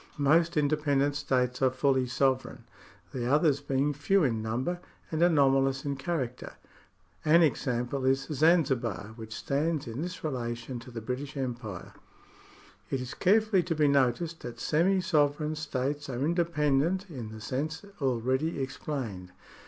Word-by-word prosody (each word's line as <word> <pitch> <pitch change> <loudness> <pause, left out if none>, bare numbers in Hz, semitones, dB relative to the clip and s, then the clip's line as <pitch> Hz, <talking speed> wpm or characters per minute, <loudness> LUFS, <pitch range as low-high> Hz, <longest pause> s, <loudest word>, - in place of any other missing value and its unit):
Most 160 +4 +3
inde 145 -1 +2
pendent 145 -1 +2
states 125 -3 0
are 130 - +5
fully 130 0 +1
sovereign, 130 +1 0 0.5
the 125 -1 -1
others 145 -1 +3
being 140 +1 0
few 165 +7 +2
in 115 -6 +1
number 125 +11 -2 0.3
and 160 0 -1
anomalous 135 -5 +3
in 140 -1 -1
character. 135 -3 -3 0.7
An 165 +2 +6
example 125 -2 0
is 135 +1 +3
Zan 160 +4 +4
zibar, 115 -6 -3
which 110 -1 -9
stands 150 +2 -1
in 120 +3 -5
this 180 +2 -5
relation 120 -3 -3
to 120 +2 -12
the 115 -2 -6
British 130 +5 -5
Empire. 120 -7 -5 1.0
It 135 - -1
is 125 +3 -5
carefully 210 +2 +3
to 165 -1 -2
be 150 -1 +3
noticed 140 +4 +1
that 120 -1 -8
semi 185 +8 +2
sovereign 150 -2 +1
states 145 -1 -3
are 130 +2 -1
independent, 170 +1 +1
in 125 - -7
the 110 - -9
sense 155 - -3 0.2
already 130 +4 0
explained. 130 -9 -4
140 Hz, 145 wpm, -29 LUFS, 125-155 Hz, 1.0 s, An